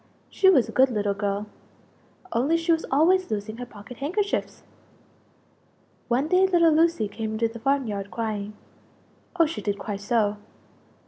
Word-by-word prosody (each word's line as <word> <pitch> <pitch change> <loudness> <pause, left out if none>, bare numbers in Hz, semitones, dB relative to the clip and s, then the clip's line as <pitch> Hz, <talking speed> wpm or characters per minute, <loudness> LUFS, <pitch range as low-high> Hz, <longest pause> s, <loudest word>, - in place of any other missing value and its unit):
She 380 - +4
was 270 -11 +4
a - - -7
good 265 +1 +4
little 205 -4 -1
girl 200 0 -2 0.9
only 295 +5 +2
she 330 0 0
was 325 -1 +1
always 360 +7 +3
losing 215 +1 -4
her 245 0 -7
pocket 220 +2 -12
handkerchiefs! 395 +9 -2 1.4
One 255 +4 +1
day 370 +3 +4
little 340 -3 +4
Lucie 320 -8 +2
came 215 +2 -5
into 230 +1 +1
the 230 +1 -10
farm 275 +2 +1
yard 200 -2 -4
crying 215 -2 -4 0.9
oh, 330 - +6
she 320 +2 -5
did 205 -1 -2
cry 205 0 -5
so! 210 0 0
235 Hz, 155 wpm, -25 LUFS, 210-325 Hz, 1.4 s, oh